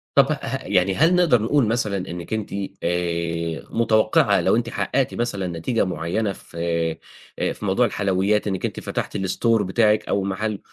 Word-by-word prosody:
طَب 140 +1 +5
ه 135 -3 -2
يعني 95 -1 +1
هل 165 +5 +4
نقدر 165 -11 +4
نقول 125 +2 +2
مثلًا 110 -3 0
إنّكِ 90 0 -6
أنتِ 110 -3 -3 0.3
آآ 85 -1 -1
متوقِّعة 110 -1 +3
لو - - +3
أنتِ 115 0 0
حقّقتِ 135 +1 -1
مثلًا 100 -6 -2
نتيجة 85 +8 -1
معيّنة 90 +4 -2
في 85 - -14 0.8
آآ - - 0
في - - -8
موضوع - - +3
الحلويات 100 +2 +1
إنّكِ 95 -2 -2
أنتِ - - -4
فتحتِ - - -4
الstore 110 +4 +1
بتاعِك 105 +2 +2
أو 100 - 0
مَحَل 100 +2 -2
105 Hz, 160 wpm, -22 LUFS, 90-115 Hz, 0.8 s, طَب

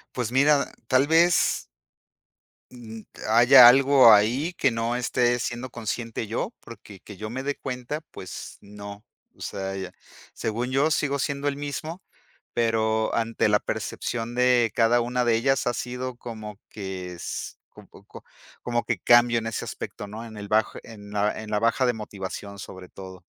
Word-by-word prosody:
Pues 120 -2 -2
mira, 140 +2 +3 0.2
tal 130 +2 +3
vez 165 +1 +3 1.0
mm, 115 -3 -10 0.3
haya 120 +2 +9
algo 135 -1 +7
ahí 120 +11 +3
que 135 - +1
no 115 +1 -1
esté 120 0 +1
siendo 120 +2 -4
consciente 115 -1 -4
yo. 150 - -3
Porque 105 -4 -13
que 105 -3 -12
yo 110 0 -6
me 130 +3 -5
de 145 0 -2
cuenta, 130 +4 -5
pues 95 - -9
no. 100 0 -10 0.3
O - - -20
sea, 95 0 -4
ya 95 -2 -6 0.4
según 120 +3 -3
yo 140 +4 +2
sigo 140 -2 0
siendo 140 +1 -2
el 140 0 -1
mismo, 155 +5 -5 0.5
pero 110 -1 0
ante 115 -1 0
la 105 0 +3
percepción 120 0 -4
de 125 -2 +3
cada 120 +2 +3
una 125 +1 -1
de 115 -1 +3
ellas 135 +2 +1
ha 120 - -1
sido 125 0 -5
como 110 -4 -8
que 95 -3 -6
es 85 - -6 0.2
un - - -14
poco - - -15 0.4
como 120 -1 -1
que 120 -5 -1
cambio 120 +3 +5
en 115 - -5
ese 115 - -3
aspecto, 105 - -7
¿no?, 110 +3 -8
en 110 -2 -10
el 100 -1 -8
bajo 110 0 +1
en 105 -2 -12
la 105 +1 0
en 105 - -9
la 105 - +1
baja 115 +3 +2
de 120 - +2
motivación, 100 -2 -7
sobre 95 -1 -10
todo. 95 -1 -11
115 Hz, 170 wpm, -25 LUFS, 105-125 Hz, 1.0 s, haya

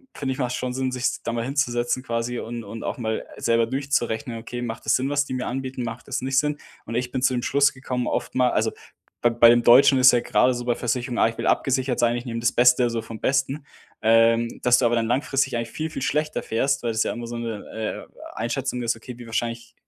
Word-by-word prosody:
finde 135 -2 -2
ich, - - -9
macht's 125 -2 -1
schon 125 -1 -3
Sinn, 130 0 -1
sich's 125 0 -2
da - - -2
mal 115 0 -2
hinzusetzen 130 -2 0
quasi 115 0 -2
und 120 +1 -6
und 110 +2 -8
auch - - -4
mal 110 -2 -2
selber 115 0 +2
durchzurechnen: 130 -2 -2
„Okay, 120 +1 -6
macht 115 -2 -5
das 110 - +3
Sinn, 130 +2 0
was 145 0 +1
die 130 - -6
mir 125 0 -3
anbieten, 130 0 -4
macht 115 0 -6
das - - -2
nicht 130 +1 -1
Sinn“. 150 0 -1 0.3
Und 115 - -7
ich 125 +1 -1
bin 125 - -3
zu 130 - +3
dem 125 - -1
Schluss 140 +2 +3
gekommen, 125 -2 -3
oftmal 125 -1 0
also - - +1 0.5
bei 120 - +3
bei 115 0 +6
dem 120 0 +4
Deutschen 130 +3 +7
ist 130 0 +8
ja 120 - +4
gerade 130 +2 +2
so 120 0 -5
bei 120 -1 +1
Versicherung: 120 +1 -2
„Ah, - - +4
ich 115 - -10
will - - -1
abgesichert 130 -1 +1
sein, 120 0 +2
ich 120 +1 -5
nehme 115 -2 -4
das 120 - +2
Beste, 125 +1 +5
also 115 -1 0
vom 115 0 -9
Besten.“, 135 +2 0 0.4
ähm, 115 +1 +3
dass 125 0 +5
du 125 - +2
aber 120 - +2
dann 115 -1 0
langfristig 130 +1 0
eigentlich 115 -1 -3
viel, 155 +1 -4
viel 155 - -5
schlechter 150 +2 -1
fährst, 125 +5 0
weil 120 - 0
das 110 0 0
ja - - -2
immer 120 - -6
so 120 0 -5
'ne, 110 -1 -5 0.2
äh, - - -14
Einschätzung 125 +2 -2
ist: 115 0 0
„Okay, 120 +2 -10
wie 120 - -10
wahrscheinlich 115 +1 -4
120 Hz, 250 wpm, -24 LUFS, 115-130 Hz, 0.5 s, ist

